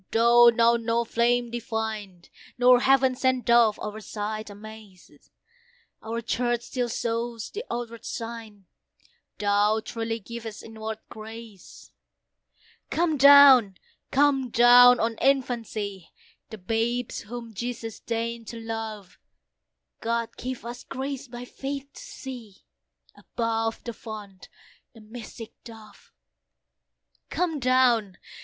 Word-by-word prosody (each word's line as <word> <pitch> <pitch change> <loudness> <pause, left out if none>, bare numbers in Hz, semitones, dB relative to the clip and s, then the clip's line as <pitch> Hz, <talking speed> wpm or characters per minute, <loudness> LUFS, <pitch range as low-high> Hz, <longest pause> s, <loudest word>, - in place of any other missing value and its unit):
though 235 +1 +6
now 235 0 +4
no 230 0 0
flame 235 +1 +1
divine, 220 -6 -4 0.3
Nor 250 0 +6
heaven 265 0 +4
sent 255 -1 0
Dove, 235 -3 +4
our 210 0 -6
sight 215 0 -5
amaze; 210 -2 -13 0.9
Our 230 +1 -4
Church 240 +1 -1
still 245 -2 -3
shows 230 -1 -3
the 435 - -5
outward 235 -1 -5
sign, 225 -4 -7 0.7
Thou 205 +1 +2
truly 225 -1 -3
givest 225 0 -8
inward 220 0 -6
grace. 220 -2 -11 1.0
Come 330 -2 +1
down! 275 -7 +8 0.3
come 270 -2 +2
down! 245 +1 +7
on 225 0 -1
infancy, 225 -8 -1 0.4
The 220 - -8
babes 225 +5 -2
whom 235 +1 -8
Jesus 230 0 -5
deign'd 230 0 -4
to 230 - -7
love; 225 -4 -6 0.8
God 230 0 -2
give 255 -1 -6
us 240 +1 -7
grace 275 +1 -5
by 240 0 -8
faith 275 +2 -6
to - - -11
see, 240 -7 -10 0.5
Above 225 -1 -3
the 235 - -5
Font, 210 -4 -10 0.5
the - - -13
mystic 225 +1 -10
Dove. 220 -2 -14 1.2
Come 335 -4 -1
down! 245 -6 +2
230 Hz, 110 wpm, -26 LUFS, 220-245 Hz, 1.2 s, down